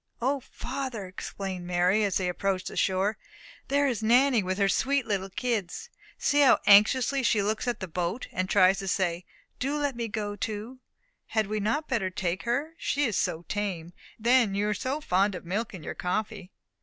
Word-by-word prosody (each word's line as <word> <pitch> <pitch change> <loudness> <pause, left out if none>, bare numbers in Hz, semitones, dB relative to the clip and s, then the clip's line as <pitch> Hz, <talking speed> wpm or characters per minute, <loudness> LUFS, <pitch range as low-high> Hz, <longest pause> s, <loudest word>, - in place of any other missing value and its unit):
"O, 270 +4 0
father," 255 -4 -5
exclaimed 185 0 -6
Mary, 180 +4 +2
as 200 -3 +1
they 185 - -1
approached 185 +1 -1
the - - -10
shore, 195 +3 +1 0.5
"there 285 +1 +2
is 240 -5 -1
Nanny 245 +2 +4
with 185 0 -2
her 200 -1 +3
sweet 275 +6 +1
little 195 -3 -2
kids. 240 - -3 0.3
See 290 0 +2
how 275 - +6
anxiously 250 +7 +5
she 215 -4 +2
looks 215 +4 -1
at 240 - -2
the 190 - -3
boat, 180 +7 -3
and 185 +1 -2
tries 190 0 +5
to 195 - -5
say, 180 -2 -1 0.3
'Do 280 +3 -1
let 285 -3 -1
me 235 -1 -3
go 205 -1 -3
too.' 215 +5 -5 0.5
Had 220 -1 +1
we 215 +2 -2
not 225 +10 -1
better 225 -8 0
take 185 0 -3
her? 280 +7 -1
She 290 +1 0
is 225 -6 -1
so 170 -2 -1
tame; 185 -5 -3 0.2
and 220 - -16
then 240 -5 +4
you 205 +1 0
are - - +1
so 260 +8 -3
fond 195 -4 +1
of 180 - -8
milk 210 +6 -2
in 185 -6 -9
your - - -5
coffee." 205 +1 -3
210 Hz, 195 wpm, -27 LUFS, 185-250 Hz, 0.5 s, how